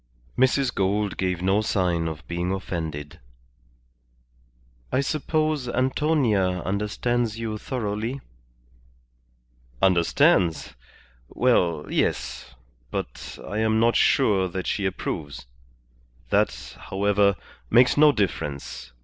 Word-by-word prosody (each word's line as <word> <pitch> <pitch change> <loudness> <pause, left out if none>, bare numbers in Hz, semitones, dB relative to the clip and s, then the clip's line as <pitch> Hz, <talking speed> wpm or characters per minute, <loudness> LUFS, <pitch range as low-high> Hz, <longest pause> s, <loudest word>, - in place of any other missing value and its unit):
Mrs. 130 0 +2
Gould 100 +1 0
gave 90 -2 -2
no 95 +3 +3
sign 90 -5 0
of 80 0 -7
being 85 +1 -2
offended. 80 -6 -5 1.7
"I 130 - +2
suppose 155 -1 -1
Antonia 125 - +1
understands 110 +3 -1
you 110 -2 -4
thoroughly?" 115 +1 -3 1.6
"Understands? 85 -1 +3 0.6
Well, 90 -11 +1
yes. - - -2 0.3
But - - -6
I 105 - -3
am 110 0 +2
not 115 +1 +3
sure 100 -8 +3
that 90 0 -5
she 100 -2 0
approves. 80 -7 -5 0.9
That, - - 0
however, 100 0 +2 0.3
makes 125 +1 +5
no 150 0 +6
difference. 75 - -3
100 Hz, 95 wpm, -24 LUFS, 90-120 Hz, 1.7 s, no